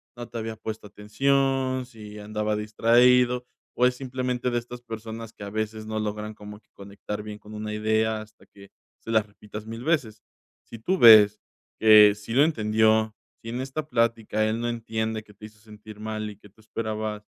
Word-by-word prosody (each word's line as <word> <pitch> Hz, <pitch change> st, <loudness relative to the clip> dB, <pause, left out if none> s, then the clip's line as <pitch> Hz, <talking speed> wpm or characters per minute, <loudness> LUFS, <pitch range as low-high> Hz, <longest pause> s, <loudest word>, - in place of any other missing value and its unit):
no 120 Hz, -1 st, -8 dB
te 120 Hz, -, -7 dB
había 110 Hz, 0 st, -4 dB
puesto 110 Hz, 0 st, -7 dB
atención, 130 Hz, +5 st, 0 dB
si 105 Hz, -3 st, -11 dB
andaba 105 Hz, 0 st, -2 dB
distraído, 120 Hz, +3 st, +3 dB, 0.3 s
o 125 Hz, +1 st, +4 dB
es 125 Hz, -, -1 dB
simplemente 125 Hz, -1 st, -2 dB
de 120 Hz, -, +1 dB
estas 120 Hz, +1 st, -10 dB
personas 115 Hz, -1 st, -7 dB
que -, -, -11 dB
a 100 Hz, -, -6 dB
veces 110 Hz, +1 st, -4 dB
no 110 Hz, 0 st, -3 dB
logran 105 Hz, 0 st, -4 dB
como 105 Hz, 0 st, -11 dB
que -, -, -42 dB
conectar 100 Hz, +1 st, -7 dB
bien 105 Hz, 0 st, -8 dB
con 105 Hz, +1 st, -12 dB
una 105 Hz, 0 st, -5 dB
idea 110 Hz, 0 st, 0 dB
hasta 110 Hz, 0 st, -16 dB
que 100 Hz, -1 st, -17 dB, 0.3 s
se -, -, -11 dB
las 110 Hz, -2 st, +3 dB
repitas 105 Hz, +1 st, -10 dB
1000 115 Hz, +2 st, -7 dB
veces. 130 Hz, -9 st, -1 dB, 0.4 s
Sí, 115 Hz, -, -11 dB
tú 185 Hz, -, 0 dB
ves 105 Hz, -2 st, +8 dB, 0.4 s
que 105 Hz, -2 st, +8 dB
sí 105 Hz, +2 st, -8 dB
lo 135 Hz, +4 st, +5 dB
entendió. 110 Hz, -5 st, +2 dB, 0.3 s
Si 115 Hz, -, -8 dB
en 120 Hz, -, -4 dB
esta 140 Hz, +3 st, -5 dB
plática 115 Hz, -3 st, +1 dB
él 110 Hz, +2 st, -1 dB
no 120 Hz, -, -1 dB
entiende 110 Hz, -1 st, -3 dB
que 105 Hz, -, -18 dB
te 105 Hz, +2 st, -12 dB
hizo 105 Hz, 0 st, -15 dB
sentir 105 Hz, 0 st, -13 dB
mal, 110 Hz, 0 st, -4 dB
y 105 Hz, -, -11 dB
que 105 Hz, -, -17 dB
tú 110 Hz, -, -24 dB
esperabas, 110 Hz, -1 st, -4 dB
110 Hz, 195 wpm, -25 LUFS, 105-120 Hz, 0.4 s, ves